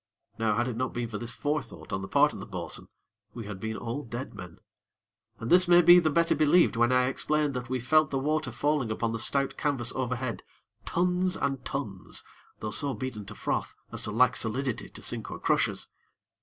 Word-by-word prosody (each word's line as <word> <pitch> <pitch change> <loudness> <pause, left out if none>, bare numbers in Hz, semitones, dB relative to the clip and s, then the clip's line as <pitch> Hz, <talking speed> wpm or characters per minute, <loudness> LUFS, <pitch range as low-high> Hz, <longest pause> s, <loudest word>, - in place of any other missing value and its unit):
Now 110 -1 +1
had 120 +1 +1
it 125 - -3
not 130 +2 -2
been 120 -1 -2
for 105 - -5
this 120 0 -2
forethought 145 -7 -4
on 95 - -1
the 95 - -5
part 145 +5 +4
of - - -8
the - - -8
bo'sun 90 -4 -5 0.5
we 115 -3 -6
had 100 -2 -7
been 110 +2 -4
all 120 +4 -4
dead 120 +3 -6
men; 90 0 -10 0.8
and 115 - -5
this 180 +1 +7
may 175 0 +7
be 175 +2 +9
the 160 -3 +2
better 170 +2 +3
believed 155 0 +4
when 120 +1 +3
I 125 0 +4
explain 150 +3 0
that 125 -2 -5
we 130 0 -1
felt 155 +4 +3
the 135 - -1
water 150 +1 0
falling 140 0 0
upon 115 +1 -1
the 115 - -3
stout 135 +4 +1
canvas 135 -5 -1
overhead, 125 -2 -2 0.4
tons 180 +1 +1
and 135 -2 -2
tons, 105 -10 -3 0.4
though 105 - -3
so 140 +3 +1
beaten 120 -6 -5
to 105 - -8
froth - - -2 0.2
as - - -2
to 105 - -3
lack 125 +4 +4
solidity 125 +2 -1
to - - -11
sink - - -2
or - - -6
crush - - +2
us. - - -5
130 Hz, 210 wpm, -28 LUFS, 115-150 Hz, 0.8 s, be